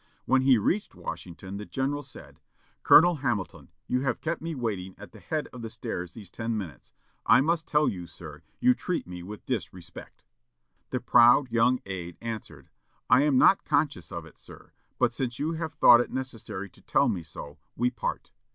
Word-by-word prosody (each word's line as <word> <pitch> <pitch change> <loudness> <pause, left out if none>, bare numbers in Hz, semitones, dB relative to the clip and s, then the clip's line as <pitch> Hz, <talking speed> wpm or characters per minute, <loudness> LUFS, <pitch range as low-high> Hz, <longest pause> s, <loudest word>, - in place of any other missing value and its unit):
When 130 0 +3
he 130 -2 +5
reached 195 - -1
Washington, 90 +4 -7
the 105 - -6
general 140 +2 -2
said, - - -12 0.4
"Colonel 175 +1 +7
Hamilton, 120 -9 -3 0.2
you 125 - 0
have 130 -3 -1
kept 165 +1 -3
me 165 0 -4
waiting 100 -7 -4
at - - -12
the - - -14
head 155 -2 -3
of 125 - -8
the 115 - -5
stairs 110 -6 -5
these 100 -6 -11
ten 115 -1 -3
minutes. 80 - -8 0.4
I - - +7
must 160 +3 0
tell 150 0 +3
you, 90 -3 -3
sir, 75 -4 -11 0.2
you 250 +1 +5
treat 180 -7 -3
me 90 0 -8
with 100 +4 -9
disrespect." 95 -7 -6 0.6
The - - -2
proud 120 +2 +5
young 120 +2 +3
aid 90 -3 -6
answered, 110 -11 -7 0.4
"I - - +7
am 145 -3 +3
not 190 +8 +5
conscious 145 -5 0
of 85 -3 -6
it, 80 - -17
sir; - - -14 0.3
but 120 - +2
since 120 -1 -3
you 155 +3 -1
have 160 -1 -4
thought 120 -5 +7
it - - -4
necessary 115 -7 -5
to - - -21
tell - - +2
me 90 - -1
so, 75 -2 -9 0.2
we 125 +2 +1
part." - - -4
120 Hz, 190 wpm, -27 LUFS, 95-145 Hz, 0.6 s, Colonel